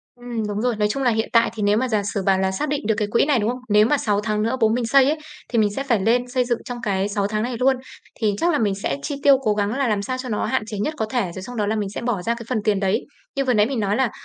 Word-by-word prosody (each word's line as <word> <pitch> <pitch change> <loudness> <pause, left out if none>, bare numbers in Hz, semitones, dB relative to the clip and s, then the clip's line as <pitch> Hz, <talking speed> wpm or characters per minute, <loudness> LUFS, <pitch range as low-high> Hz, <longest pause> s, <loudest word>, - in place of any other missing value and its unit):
Ừm, 240 -3 -4
đúng 205 0 -2
rồi. 240 -1 0
Nói 210 0 +1
chung 270 +6 -2
là 250 - +3
hiện 220 -1 0
tại 230 -1 +4
thì 220 - -4
nếu 205 +1 +3
mà 255 +3 +1
giả 215 -3 +1
sử 200 - -1
bảo 190 0 +2
là 190 0 +1
xác 245 +11 -2
định 280 -6 -2
được 220 - +2
cái 210 -2 0
quỹ 235 - +3
này, 285 -3 +2
đúng 215 +1 +1
không? 250 - -4
Nếu 210 0 +5
mà 295 - +3
6 205 -4 +1
tháng 210 0 -1
nữa 230 +4 0
bố 220 - +5
mình 235 +2 0
xây 270 +3 +5
ấy, 300 +4 +1 0.3
thì 235 - 0
mình 210 -2 +3
sẽ 275 - -1
phải 235 -7 +1
lên 240 +5 +2
xây 250 0 +1
dựng 240 -1 0
trong 245 -1 -6
cái 195 -3 0
6 200 -1 -1
tháng 215 +1 -1
này 245 +1 -2
luôn. 265 +2 +3 0.4
Thì 210 -3 +2
chắc 345 +7 +2
là 295 - +1
mình 205 -3 +1
sẽ 195 -8 -2
chi 285 - -3
tiêu 275 -2 +6
cố 215 -4 +2
gắng 205 +1 -1
là 275 -2 +1
làm 210 -2 0
sao 255 +5 -3
cho 255 0 -5
nó 215 - -1
hạn 260 - 0
chế 215 -2 -5
nhất 300 +10 -1
có 220 - -1
thể, 245 -1 +1
rồi 190 - -7
xong 245 +5 -8
đó 210 -2 0
là 215 +2 0
mình 205 -2 -2
sẽ - - -3
bỏ 235 -6 -1
ra 230 +5 0
cái 235 0 -9
phần 250 - 0
tiền 205 -3 +2
đấy. 195 0 0 0.3
Như 275 - +1
vừa 255 - +2
nãy 210 -1 +4
mình 260 -2 -2
nói 205 0 0
là 260 -2 +1
225 Hz, 345 wpm, -22 LUFS, 210-250 Hz, 0.4 s, tiêu